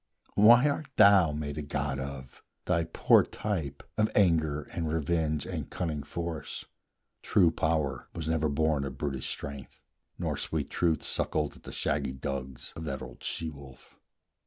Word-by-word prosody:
Why 120 +6 +7
art 145 +1 -1
thou 100 -6 +7
made 75 0 -4
a - - -2
god 70 -1 -2
of, 65 -2 -7 0.2
thou 85 -2 +1
poor - - +5
type 80 -10 -4 0.2
Of 110 0 +3
anger, 80 -6 +3
and 80 -3 -2
revenge, 80 -1 0
and - - -5
cunning 80 -4 -2
force? 85 +1 -5 0.6
True 90 -5 +4
Power 80 -3 -1
was 80 -2 -4
never 80 -1 +1
born 75 0 +1
of 70 - -5
brutish 70 -3 -3
Strength, 70 -1 -7 0.4
Nor - - -2
sweet - - -3
Truth 85 -3 +1
suckled - - -1
at - - -18
the - - -7
shaggy 70 -2 -1
dugs 65 -1 -5
Of 80 - -6
that 70 -3 -4
old - - -11
she 80 -1 -3
wolf. 70 -2 -14
75 Hz, 160 wpm, -29 LUFS, 70-85 Hz, 0.6 s, Why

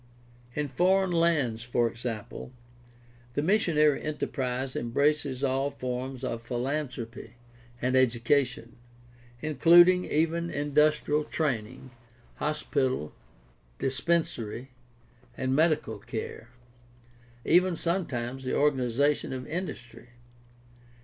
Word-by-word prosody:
In 150 -1 -1
foreign 185 +7 +2
lands, 160 -10 +2
for 120 0 +1
example, 115 0 -6 0.8
the 145 - 0
missionary 155 -6 +3
enterprise 130 -3 -3
embraces 140 +2 0
all 135 +1 +1
forms 130 -1 -5
of 115 -3 -3
philanthropy 120 -2 -4 0.4
and 125 +2 0
education, 125 0 +1 0.7
including 175 +5 +6
even 165 +2 0
industrial 150 +1 +2
training, 130 -5 -3 0.5
hospital, 135 - -1 0.6
dispensary, 135 - -1 0.7
and 130 0 0
medical 155 +1 +1
care, 115 - -6 1.0
even 180 +2 +4
some 170 +2 -1
times 120 +1 -4
the 130 - -1
organization 140 0 +1
of 130 -1 -5
industry. 150 -8 -6
135 Hz, 90 wpm, -28 LUFS, 125-155 Hz, 1.0 s, including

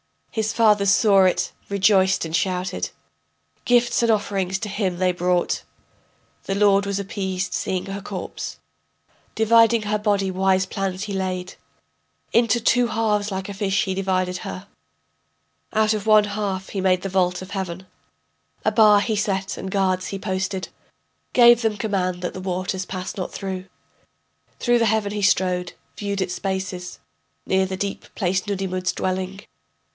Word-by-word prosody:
His 220 -1 -1
fathers 210 -3 +4
saw 200 -2 +5
it, 185 - +1 0.2
rejoiced 195 -1 +3
and 160 - -7
shouted. 180 +1 -1 0.8
Gifts 240 -1 +3
and 235 - +2
offerings 195 -3 0
to 210 - -4
him 195 -3 -1
they 185 0 +2
brought. 180 0 0 0.8
The 195 - -1
lord 200 -1 +4
was 200 0 -2
appeased 190 -2 -3
seeing 185 -1 -2
her 195 +1 -5
corpse. - - -6 0.8
Dividing 230 0 +4
her 210 0 -1
body, 200 -2 +1
wise 190 0 +2
plans 190 0 -3
he 210 -1 -4
laid. 185 -1 -3 0.8
Into 235 0 +3
two 245 +1 +3
halves 215 -2 0
like 190 0 -4
a - - -4
fish 195 0 0
he 190 - -2
divided 185 -1 -1
her, 185 +2 -7 1.1
Out 215 0 +3
of 215 0 -4
one 215 -1 +7
half 200 -2 -3
he 195 - -3
made 185 -1 +2
the 195 - -2
vault 180 -1 +1
of 185 - -12
heaven, 190 -2 -4 0.8
A - - +3
bar 210 -2 +6
he 220 0 -1
set 195 -2 -1
and 190 - -5
guards 185 -1 0
he 195 - -4
posted, 190 0 -3 0.6
Gave 240 -1 +7
them 220 -2 0
command 185 -4 -1
that 175 - -2
the 185 - -7
waters 185 +1 -2
pass 185 0 -6
not 185 - -4
through. 190 -2 -5 0.9
Through 240 -1 +3
the 230 - +3
heaven 220 -2 +1
he 210 0 -3
strode, 180 -2 +1 0.2
viewed 200 -1 -2
its 180 -1 -1
spaces, 190 -2 -4 0.5
Near 190 0 +2
the 190 0 -4
deep 200 0 -4
placed 185 +1 0
Nudimmud's 185 -2 -2
dwelling. 185 +1 -3
195 Hz, 155 wpm, -23 LUFS, 185-210 Hz, 1.1 s, one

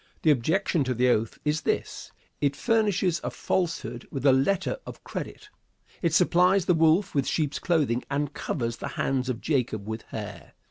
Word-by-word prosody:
The 155 - +6
objection 160 - +1
to 130 -1 -1
the 125 +2 +3
oath 115 -2 +1
is 150 +1 +1
this: - - -2 0.3
It 140 -1 +1
furnishes 205 -4 +1
a - - -1
falsehood 175 -3 -2
with 135 -1 -5
a 135 - +7
letter 155 - +1
of - - -10
credit. - - -7 0.5
It 170 - +1
supplies 180 +2 +4
the 180 - +4
wolf 165 +4 +3
with 140 -2 +1
sheep's 150 -3 0
clothing 145 -9 +1
and 145 +1 -1
covers 120 -6 -3
the - - -5
hands 130 -1 0
of 125 -2 -3
Jacob 125 -8 -1
with 110 +1 -4
hair. 105 -2 -8
145 Hz, 175 wpm, -26 LUFS, 125-175 Hz, 0.5 s, a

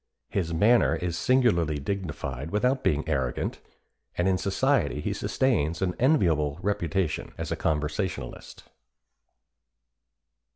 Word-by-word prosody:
His 85 -4 -1
manner 105 +9 +4
is 85 -2 -3
singularly 85 - +2
dignified 70 -4 -4
without 125 +7 +1
being 75 +1 +1
arrogant, 65 -5 -1 0.6
and 90 - +2
in 95 -1 +2
society 100 - +1
he - - -2
sustains 85 - 0
an 95 -2 0
enviable 85 - +2
reputation 95 -3 -1
as - - -4
a - - +1
conversationalist." 80 +5 -3
85 Hz, 110 wpm, -27 LUFS, 75-105 Hz, 0.6 s, manner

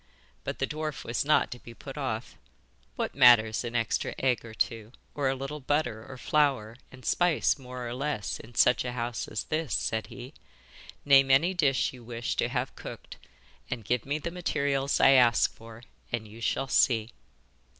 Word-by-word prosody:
But - - -4
the 135 - 0
dwarf 150 -5 -5
was 115 0 -1
not 150 0 +3
to 125 - -7
be 120 -1 -12
put 135 +3 -9
off. 130 -5 -4 0.6
'What - - -2
matters 110 -2 +6
an 120 0 -5
extra 115 -1 -1
egg 130 -2 +1
or 115 -1 -10
two, 110 +1 -2 0.2
or 140 -2 0
a 135 - 0
little 135 +3 -5
butter 130 -5 -1
or 130 +2 -10
flour 130 -6 +1 0.2
and 130 -1 -14
spice 175 -4 +2
more 125 -1 -7
or 120 - -4
less, 135 -5 -3
in 115 +1 -13
such 125 - +4
a 125 -1 -4
house 120 -1 -3
as 105 - -3
this?' 155 -2 -2
said 110 -1 -1
he. 130 +3 -10 0.7
'Name 135 -1 +6
any 155 +8 +4
dish 140 -9 +1
you 125 -2 -12
wish 120 0 -4
to - - +1
have - - -3
cooked, - - -9 0.5
and 115 -4 -5
give 120 +1 0
me 145 +2 -2
the 170 +2 -5
materials 140 -5 0
I - - +7
ask 120 -4 +5
for, 115 +1 -13 0.3
and 115 -2 -3
you 110 +2 -12
shall 135 - -1
see. 115 -3 +2
125 Hz, 185 wpm, -28 LUFS, 115-140 Hz, 0.7 s, I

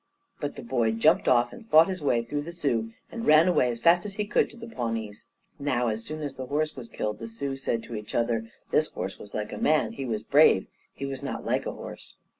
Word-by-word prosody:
But - - -3
the - - -8
boy 115 -2 +1
jumped 150 +9 +3
off, 120 -1 +4
and 225 -1 -13
fought 160 +1 +7
his 185 -3 -4
way 120 -5 +2
through 145 +5 -3
the 165 +4 -7
Sioux, 125 -10 -1 0.2
and 230 -1 -5
ran 155 +3 +7
away 150 -8 +3
as 120 -1 -3
fast 170 +7 +5
as 200 -2 -6
he 210 - -1
could 205 - +2
to - - -14
the 230 - -8
Pawnees. 115 - -4 0.3
Now, 125 -4 +1
as 110 +1 -3
soon 155 +5 -6
as 145 - -3
the 130 -1 -5
horse 155 +3 -1
was 125 -3 -8
killed, 105 -2 -3
the 115 - -6
Sioux 135 +5 -4
said 115 -4 -2
to - - -9
each 105 0 -6
other: 115 -1 0 0.2
"This 155 - +3
horse 95 +2 -5
was 105 - -10
like 105 0 -3
a - - -5
man. 155 0 +2
He 135 - -5
was 110 -4 -2
brave. - - +5 0.3
He 140 - -6
was 135 -1 -5
not - - -5
like - - 0
a - - -1
horse." - - -10
130 Hz, 250 wpm, -27 LUFS, 115-155 Hz, 0.3 s, fought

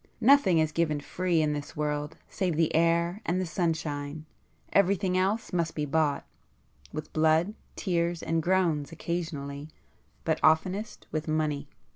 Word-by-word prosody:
Nothing 240 -9 +5
is 155 -1 +2
given 155 -2 0
free 170 +2 0
in 150 -1 +1
this 145 0 -6
world 150 +1 -2
save 180 -5 -1
the 160 0 +2
air 170 +4 +2
and 175 +2 0
the 185 - -1
sunshine,—everything 165 +4 -1
else 195 +4 0
must 170 -2 0
be 150 - -1
bought,—with 140 - -4
blood, 160 +5 +3 0.2
tears 170 -3 -1
and 165 0 0
groans 170 -4 +1
occasionally,—but 155 -1 -5
oftenest 185 +7 +2
with 155 0 -3
money." 155 -2 -1
160 Hz, 125 wpm, -28 LUFS, 150-180 Hz, 0.2 s, Nothing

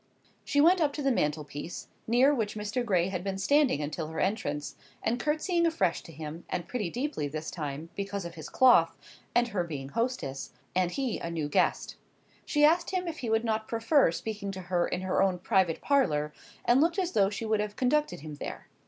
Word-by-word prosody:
She 285 - 0
went 345 +4 +6
up 290 -2 +2
to 295 - -4
the 275 - +3
mantelpiece, 150 - -2 0.2
near 250 +5 +5
which 220 -6 -1
Mr. 210 +4 -2
Gray 185 -5 +2
had 180 -2 -3
been 195 -1 -2
standing 270 - +3
until 155 +2 -3
her 160 - -5
entrance, 150 -8 -1 0.3
and 235 +3 0
curtseying 335 +5 +1
afresh 190 - +1
to - - -12
him, 160 +1 -7
and 175 - -3
pretty 215 -8 -2
deeply 245 - -2
this 155 +2 -5
time, 150 0 -5
because 200 -1 -3
of 170 - -6
his 160 -2 -8
cloth, 245 -11 +5 0.4
and 240 0 +3
her 190 -5 0
being 140 -5 -6
hostess, 230 - -3 0.2
and 185 -1 +2
he, 265 -5 -1
a 170 - -4
new 160 -3 -2
guest. 145 - +1 0.5
She 295 -1 +4
asked 335 +3 +3
him 365 -1 -2
if 325 -1 -4
he 235 - -3
would 225 +1 +2
not 220 -1 -1
prefer 230 - +3
speaking 205 +2 -4
to 190 - -6
her 175 -1 0
in 180 - -3
her 185 0 +1
own 190 -2 +2
private 185 -3 +1
parlour, 150 - +2 0.3
and 245 +3 +5
looked 335 +4 +2
as 365 -2 0
though 195 - +3
she 205 +2 -4
would 215 -1 +1
have 210 0 -2
conducted 295 - +1
him 155 0 -7
there. - - -7
205 Hz, 205 wpm, -29 LUFS, 165-260 Hz, 0.5 s, went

